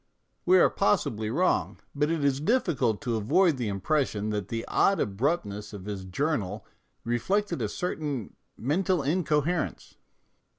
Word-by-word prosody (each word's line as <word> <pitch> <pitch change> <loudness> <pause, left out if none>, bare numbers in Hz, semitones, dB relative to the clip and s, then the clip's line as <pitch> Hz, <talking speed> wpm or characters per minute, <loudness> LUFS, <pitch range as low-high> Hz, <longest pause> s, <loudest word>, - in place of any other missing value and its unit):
We 185 +1 +7
are - - +5
possibly 105 +1 +1
wrong, 175 +10 +1 0.2
but 150 +1 +1
it 165 -3 0
is 140 -1 +2
difficult 150 - +1
to 120 -4 0
avoid 155 - +3
the 120 -3 -2
impression 105 +1 0
that 105 -3 -2
the 115 +1 -4
odd 195 - +3
abruptness 105 - -1
of 100 -2 -8
his 100 -2 -5
journal 105 - -2 0.4
reflected 190 - 0
a - - -1
certain 150 - -3 0.2
mental 175 - +1
inco 150 0 +1
herence. 175 0 -2
135 Hz, 140 wpm, -27 LUFS, 105-165 Hz, 0.4 s, We